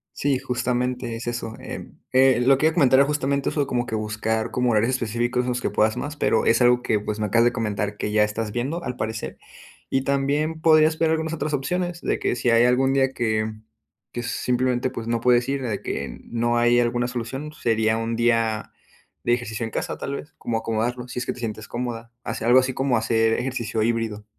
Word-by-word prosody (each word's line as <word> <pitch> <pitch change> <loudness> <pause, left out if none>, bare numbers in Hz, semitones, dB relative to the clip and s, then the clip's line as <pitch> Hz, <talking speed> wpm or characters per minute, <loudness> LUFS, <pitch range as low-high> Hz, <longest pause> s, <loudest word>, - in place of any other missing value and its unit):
Sí, 140 -2 +1
justamente 125 -1 -2
es 115 - -7
eso. 120 -2 -4
Eh, - - -8 0.2
eh, 130 -1 +5
lo 135 +1 +5
que 155 - +3
yo 160 - +2
comentaba 135 -5 +5
era 140 - +5
justamente 140 -1 0
eso 145 -2 0
como 120 -2 -1
que 110 - -4
buscar 110 +1 -1
como 125 -1 +1
horarios 115 +2 +2
específicos 120 0 0
en - - -4
los 125 0 -1
que - - 0
puedas 110 0 +2
más, 150 +1 -4
pero - - +2
es 115 +2 +3
algo 125 0 +4
que 110 -3 +1
pues 105 +1 -4
me 105 - 0
acabas 115 +3 +3
de 120 - +3
comentar 105 -3 -2
que 105 - -3
ya 105 0 +4
estás 105 0 -1
viendo 140 +10 -3
al 125 0 -4
parecer. 110 -1 -4 0.5
Y 135 - +1
también 145 +3 0
podrías 155 0 +5
ver 165 -1 +2
algunas 160 0 -1
otras 150 -2 -2
opciones 175 +5 -2
de - - 0
que - - -1
si 120 0 +1
hay 115 +1 +5
algún 130 +2 +3
día 135 -1 +2
que 110 -2 0 0.6
que 120 - -4
si 120 - -4
simplemente 125 0 0
pues 115 -3 -6
no 115 0 0
puedes 125 0 +3
ir 135 0 -1
de 110 -5 -2
que, 70 - -4
no 120 0 0
hay 120 +1 +4
alguna 120 +1 0
solución 125 +5 -5
sería 110 -4 +1
un 115 0 -2
día 115 -2 +1 0.5
de 120 - +2
ejercicio 120 -2 -2
en 115 - -4
casa, - - -3
tal 140 - -4
vez 150 - -10
como 115 -1 -2
acomodarlo. 120 +3 -2
Si 125 - -5
es 125 - -2
que - - -1
te - - -12
sientes 110 -2 -5
cómoda. 120 -1 -5
Hacer - - -4
algo 125 +2 +7
así 130 0 -2
como 135 -2 +1
hacer 115 0 +2
ejercicio 120 -4 -2
híbrido. 110 -2 -1
120 Hz, 220 wpm, -23 LUFS, 115-130 Hz, 0.6 s, algo